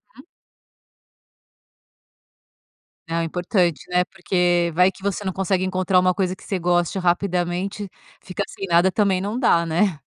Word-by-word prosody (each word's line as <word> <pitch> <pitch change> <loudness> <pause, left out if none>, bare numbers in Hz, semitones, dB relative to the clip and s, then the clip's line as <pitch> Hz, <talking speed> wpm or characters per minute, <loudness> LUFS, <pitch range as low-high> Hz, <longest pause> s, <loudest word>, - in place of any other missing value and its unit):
Uhum. - - -15 2.8
Ah, 165 0 -1
é - - -1
importante, 175 0 0
né, 180 0 +3
porque 175 -2 0
vai 180 +3 +4
que 190 - -18
você 200 0 -2
não 190 - -2
consegue 190 0 -1
encontrar 185 0 +2
uma 185 0 +3
coisa 185 0 -1
que - - -18
você 195 - -2
goste 175 +1 0
rapidamente, 180 +2 -1 0.3
fica 185 +2 -4
sem 195 - -7
nada 175 +2 +4
também 195 -3 +1
não 205 +4 -3
dá, 170 -9 +3
né. 170 0 0
180 Hz, 150 wpm, -22 LUFS, 175-195 Hz, 2.8 s, vai